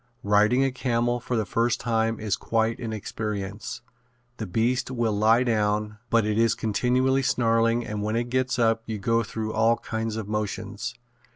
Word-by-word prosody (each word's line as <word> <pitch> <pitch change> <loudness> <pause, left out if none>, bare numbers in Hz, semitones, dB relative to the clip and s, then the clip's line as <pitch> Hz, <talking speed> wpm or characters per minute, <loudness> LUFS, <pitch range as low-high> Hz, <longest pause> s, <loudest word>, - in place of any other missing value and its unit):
Riding 105 +5 +4
a 135 - 0
camel 120 -1 0
for 125 +1 -3
the 110 - 0
first 115 +5 0
time 115 -1 0
is 105 -3 0
quite 115 0 0
an 115 -2 -4
experience. 105 +1 -5 0.6
The 110 - -4
beast 115 +8 0
will 120 -4 0
lie 110 +4 +4
down, 105 -2 0
but 115 -2 +3
it 105 +1 0
is 115 0 +3
continually 125 +5 +1
snarling 115 -1 +2
and 105 -1 -4
when 105 +2 -1
it 120 +1 -2
gets 130 -1 0
up 115 -1 +2
you 110 -1 -3
go 115 +3 +1
through 110 +1 -4
all 115 +1 +3
kinds 110 -1 -3
of 110 -2 -4
motions. 105 +2 -3
115 Hz, 175 wpm, -25 LUFS, 105-120 Hz, 0.6 s, Riding